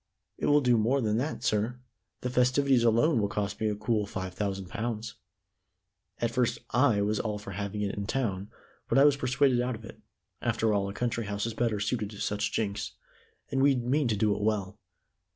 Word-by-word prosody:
"It - - 0
will 145 0 +5
do 125 -3 +3
more 125 +6 +2
than 110 -3 +1
that, 145 +6 -2
sir. 110 +4 0 0.4
The 125 - -2
festivities 125 0 +3
alone 120 +3 +3
will 100 - +1
cost 100 0 -3
me 110 - +2
a 105 - -1
cool 105 -1 0
five 95 -2 -5
thousand 95 -1 -3
pounds. 115 +3 -4 1.0
At 115 -1 -1
first 125 0 +1
I 120 -5 +3
was 105 +1 0
all 105 -2 -2
for 105 -1 -8
having 100 +1 -3
it 100 - -1
in 100 -1 -4
town, 105 -7 -2 0.4
but - - +3
I 140 - +7
was 145 -1 +5
persuaded 130 -1 +2
out 125 0 -1
of 110 0 -11
it. - - -12 0.4
After 110 -1 +1
all, 100 -1 0
a - - -6
country 120 -2 -1
house 100 +1 -2
is 115 - -3
better 115 -2 0
suited 105 0 -1
to 105 - -10
such 105 +1 -1
jinks. 105 -1 -2 0.6
And 135 - +1
we 140 0 +5
mean 130 +3 +1
to 110 -3 0
do 105 0 +2
it 105 - -5
well." 105 -1 -1
110 Hz, 205 wpm, -29 LUFS, 105-125 Hz, 1.0 s, I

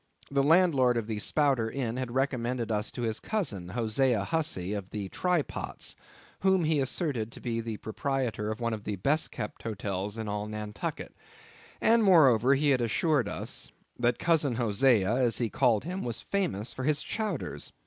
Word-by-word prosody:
The 140 0 +3
landlord 145 -6 +4
of 115 - -1
the 110 -1 -3
Spouter 135 -2 +1
Inn 120 -2 -3
had 130 -1 -2
recommended 125 -3 -1
us 105 0 -1
to 120 - -4
his 110 -2 -1
cousin 105 - -2
Hosea 115 +1 +1
Hussey 105 - -1
of 100 -3 -5
the 100 -2 -5
Try 180 - +1
Pots, - - -6 0.4
whom 190 -2 +3
he 155 -1 +2
asserted 130 - -2
to - - -10
be 115 -2 -2
the 115 -2 -5
proprietor 120 -2 -2
of 110 - -4
one 115 -1 -1
of 105 -2 -5
the 105 - -2
best 140 - +1
kept 105 - -6
hotels 100 -1 -3
in 110 -1 -4
all 105 0 -3
Nantucket, 105 -1 -5 0.6
and 230 0 +4
moreover 140 - +6
he 145 +1 +2
had 130 -2 +3
assured 125 0 +1
us - - -5 0.3
that 120 0 +2
Cousin 155 -7 +2
Hosea, 115 -2 +3
as 120 -5 +2
he 115 -3 -1
called 120 -6 +2
him, 185 +3 -4
was 120 -3 -3
famous 170 - -2
for 130 - -5
his 150 +2 +1
chowders. 210 - -3
120 Hz, 180 wpm, -29 LUFS, 110-145 Hz, 0.6 s, moreover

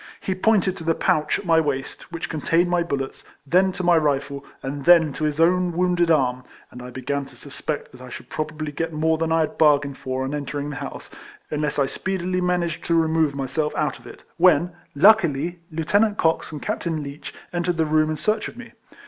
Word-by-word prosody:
He 190 - -2
pointed 190 -1 +2
to - - -7
the 165 0 +1
pouch 150 -1 +1
at 200 - -8
my 165 -2 +4
waist, 145 +1 -3
which 170 -1 -4
contained 165 +3 +1
my 175 -1 +2
bullets, 140 -5 -3 0.2
then 185 +6 +3
to 185 - -4
my 175 -1 +5
rifle, 140 -2 -1 0.2
and 140 +1 -4
then 165 -4 +6
to 155 - -2
his 150 0 -2
own 180 +1 +3
wounded 175 -1 +2
arm, 130 -5 +2 0.3
and 125 - -10
I 125 - -8
began 140 +3 -3
to - - -15
suspect 145 +1 -5
that 125 - -14
I 130 - -10
should - - -9
probably 155 0 -4
get 165 +3 -3
more 160 +1 +1
than 165 0 -1
I 165 0 +3
had 155 - -3
bargained 140 -3 +3
for 130 0 -3
on 135 +2 -3
entering 145 0 -4
the 140 - -6
house, - - -7 0.4
unless 150 -1 -1
I 140 - +3
speedily 185 +4 -2
managed 175 -2 -1
to 170 - +1
remove 160 -2 +1
myself 140 +3 -2
out - - -1
of - - -15
it, - - -12
when, 175 -1 +4 0.2
luckily, 175 -2 +4
Lieutenant 205 +7 +1
Cox 160 0 +1
and 150 -2 -7
Captain 160 -3 -2
Leech 140 +1 -8 0.2
entered 175 0 -1
the 160 - +2
room 155 0 +2
in 155 - -1
search 215 +6 0
of - - -11
me. 245 -2 -10
160 Hz, 210 wpm, -23 LUFS, 145-175 Hz, 0.4 s, then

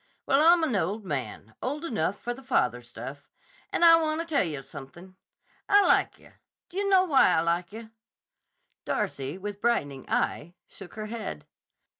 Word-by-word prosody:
Well, 275 - +3
I'm 335 +1 +6
an 260 -8 0
old 200 +3 -1
man; 125 - -5
old 295 +5 -3
enough 200 - -2
for 240 - -4
the 260 - -12
father 125 - 0
stuff. 130 +4 -10 0.4
And 345 - +3
I 330 0 +8
wanta 315 +1 -1
tell 315 -4 +1
yah 150 -6 -4
something. 175 +8 -12 0.5
I 405 0 +6
like - - +3
yah. - - -19 0.4
D' 365 - -9
yah 405 - 0
know 380 -2 +5
why 285 -7 +5
I 160 - +3
like 170 +2 -1
yah?" 220 +1 -9 0.9
Darcy, 140 +5 -3
with 205 +1 -7
brightening 145 - -1
eye, 175 +4 -1
shook 195 -3 -13
her 215 -1 -5
head. 225 0 -6
205 Hz, 170 wpm, -27 LUFS, -, 0.9 s, I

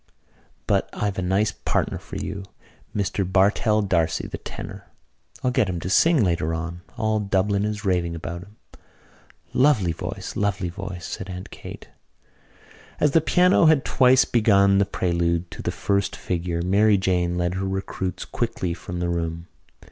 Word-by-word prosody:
"But - - +1
I've 100 -2 -2
a - - 0
nice 95 +4 +1
partner - - -2
for - - -10
you, 100 0 -4 0.5
Mr 100 -1 0
Bartell 100 +3 +2
D'Arcy, 85 -5 +1
the - - -6
tenor. - - -8 0.6
I'll 125 - +2
get 125 -6 +2
him 90 -2 -2
to 90 +3 -4
sing 160 - +5
later 85 -3 0
on. 85 +2 -5 0.2
All 110 -2 +1
Dublin 100 0 +1
is 105 0 -4
raving 90 -3 0
about 85 +1 -6
him." 100 +3 -15 1.0
"Lovely 125 - +3
voice, 80 - -6
lovely 100 -3 0
voice!" 90 -1 -7
said 95 - -6
Aunt 90 0 -7
Kate. - - -10 1.1
As 150 - +3
the 160 - +4
piano 180 +1 +4
had 155 -4 +4
twice 130 0 +5
begun 100 -4 +4
the 100 - +4
prelude 85 -2 -1
to - - -7
the - - -2
first 100 -1 -1
figure 85 -1 -2
Mary 100 +3 +4
Jane 90 -2 0
led 90 0 0
her 95 +1 -2
recruits 95 -1 -3
quickly 90 -2 -2
from 90 0 -6
the 90 - 0
room. 85 0 -3
95 Hz, 160 wpm, -24 LUFS, 85-105 Hz, 1.1 s, sing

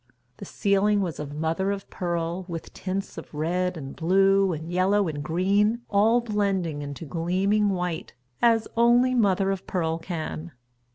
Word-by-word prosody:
The - - -8
ceiling 200 0 +2
was 175 -5 -3
of 145 -1 -6
mother 160 +5 -1
of 200 -1 -3
pearl, 170 0 -2
with 165 -2 -7
tints 195 +1 -4
of - - -12
red 180 +4 -1
and 135 -3 -7
blue 195 +3 +3
and 160 -1 -5
yellow 190 +2 +2
and 150 -2 -4
green, 200 +8 +1
all 220 +4 +4
blending 195 -8 -1
into 145 +3 -6
gleaming 185 +7 +1
white, 180 -3 -3 0.3
as 230 -2 +4
only 240 +2 +4
mother 195 -5 +2
of 195 -1 -5
pearl 165 -3 -1
can. 165 -1 -5
185 Hz, 155 wpm, -25 LUFS, 165-200 Hz, 0.3 s, all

